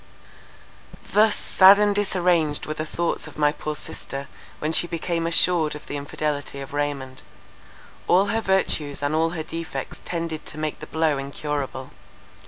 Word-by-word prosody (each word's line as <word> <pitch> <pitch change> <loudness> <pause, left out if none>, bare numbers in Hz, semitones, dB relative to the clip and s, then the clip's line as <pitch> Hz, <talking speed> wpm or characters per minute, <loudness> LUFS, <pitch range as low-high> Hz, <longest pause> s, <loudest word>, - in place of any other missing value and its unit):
Thus 215 0 +5
sad 190 +1 +7
and 205 0 +3
disarranged 180 -6 +1
were 155 - -3
the 155 +1 -4
thoughts 170 +1 -2
of - - -12
my 150 -1 +4
poor 150 0 -4
sister, 140 -1 -7 0.3
when 155 - -2
she 175 - +3
became 170 0 -2
assured 165 -2 +3
of 150 - -10
the - - -5
infidelity 145 0 -3
of 135 0 -8
Raymond. 140 -3 -3 0.9
All 185 +3 +5
her 225 - +1
virtues 155 -8 0
and 145 +2 0
all 160 +1 +2
her 160 - -2
defects 160 -5 -6
tended 165 -2 -4
to 150 - -6
make 155 -1 -3
the 155 - -8
blow 160 -3 +1
incurable. 140 -1 -4
155 Hz, 160 wpm, -24 LUFS, 145-170 Hz, 0.9 s, sad